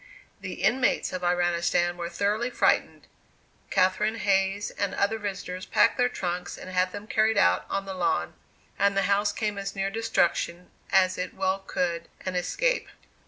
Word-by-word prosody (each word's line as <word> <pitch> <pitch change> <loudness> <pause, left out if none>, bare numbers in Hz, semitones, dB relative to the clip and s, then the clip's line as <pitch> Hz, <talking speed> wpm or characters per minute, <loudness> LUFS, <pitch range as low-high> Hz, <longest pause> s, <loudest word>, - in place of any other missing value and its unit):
The 185 -2 -6
inmates 250 +2 +2
of 185 - -3
Iranistan 175 0 +1
were 170 -1 -4
thoroughly 210 +6 0
frightened; - - +1 0.6
Catherine 200 +4 +2
Hayes 195 -1 +1
and 200 -1 -2
other 220 +3 +1
visitors 190 -3 -5
packed 230 +4 +3
their 245 0 +4
trunks 180 -3 -4
and 185 - -9
had 185 0 +1
them 205 +1 -7
carried 220 0 +2
out - - +3
on 195 0 -2
the 195 - -5
lawn; 170 - 0 0.5
and 200 0 +3
the 195 - +3
house 200 +2 +2
came 210 -2 -2
as 195 0 -5
near 195 0 -1
destruction 180 -5 0 0.2
as 185 -1 +3
it 180 0 -4
well 190 0 0
could, 175 -3 -2 0.2
and 185 -1 -2
escape. - - 0
195 Hz, 165 wpm, -27 LUFS, 180-205 Hz, 0.6 s, their